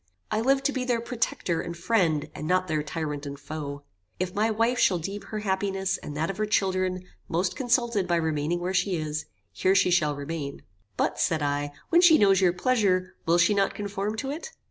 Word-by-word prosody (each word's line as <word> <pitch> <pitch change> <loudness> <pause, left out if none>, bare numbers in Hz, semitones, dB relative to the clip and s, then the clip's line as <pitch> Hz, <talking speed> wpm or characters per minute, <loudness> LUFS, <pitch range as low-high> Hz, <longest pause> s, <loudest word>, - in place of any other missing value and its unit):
I 215 - +1
live 270 +3 +2
to 285 - +2
be 260 -2 -2
their 245 -2 +1
protector 230 -7 -1
and 170 0 -6
friend, 170 -5 +1
and 155 - -6
not 185 +1 +2
their 155 -2 0
tyrant 150 -2 -4
and 140 0 -7
foe. 145 -1 -6 0.4
If 180 0 -2
my 215 +2 +1
wife 230 +3 +1
shall 185 - +4
deem 195 +5 -5
her 215 +1 -5
happiness, 195 -1 -1
and 145 - -7
that 160 +4 0
of 195 - -10
her 215 0 0
children, 185 -3 0 0.3
most 175 +2 0
consulted 240 -6 +1
by 175 - +2
remaining 160 0 0
where 180 +2 -2
she 190 0 +1
is, 155 -1 -3 0.3
here 190 +1 +2
she 180 - +4
shall 155 -4 +2
remain." 140 0 -5 0.3
"But," - - 0
said 155 -2 +1
I, 145 0 -1 0.2
"when 340 - +5
she 340 -3 +7
knows 195 -2 +4
your 180 -2 +5
pleasure, 185 -2 +1
will 170 +1 +4
she 175 +5 +4
not 200 -1 +1
conform 205 +1 -3
to 270 +4 -3
it?" 330 +11 -6
185 Hz, 210 wpm, -26 LUFS, 160-215 Hz, 0.4 s, she